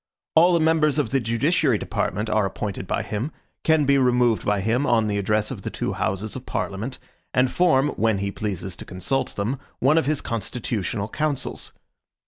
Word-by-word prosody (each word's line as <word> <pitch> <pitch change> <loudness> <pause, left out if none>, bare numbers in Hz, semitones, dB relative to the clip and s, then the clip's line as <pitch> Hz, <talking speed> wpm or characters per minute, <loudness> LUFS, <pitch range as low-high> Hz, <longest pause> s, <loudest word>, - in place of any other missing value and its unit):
All 175 +3 +6
the - - +3
members 155 -2 +3
of 150 - 0
the 135 - +3
judiciary 120 +8 +2
department 105 +4 -2
are 110 -1 +2
appointed 100 0 -5
by - - -1
him, 115 +9 -3 0.3
can 160 -2 +4
be 140 0 +4
removed 125 -3 +3
by 105 -1 +1
him 120 +7 +1
on 115 -2 +3
the 105 -1 0
address 105 +1 0
of - - -6
the - - -4
two - - -3
Houses 95 +3 -2
of 130 - -8
Parliament, 110 +7 -3 0.4
and 125 0 +3
form, 150 -6 +3
when 110 -6 +1
he 100 +1 -2
pleases 95 -3 -4
to - - -8
consult 95 +9 -2
them, 115 +7 -2 0.2
one 150 +5 +4
of 160 - -2
his 150 -2 +1
constitutional 110 -2 -3
councils. 150 +4 -3
120 Hz, 185 wpm, -24 LUFS, 105-140 Hz, 0.4 s, All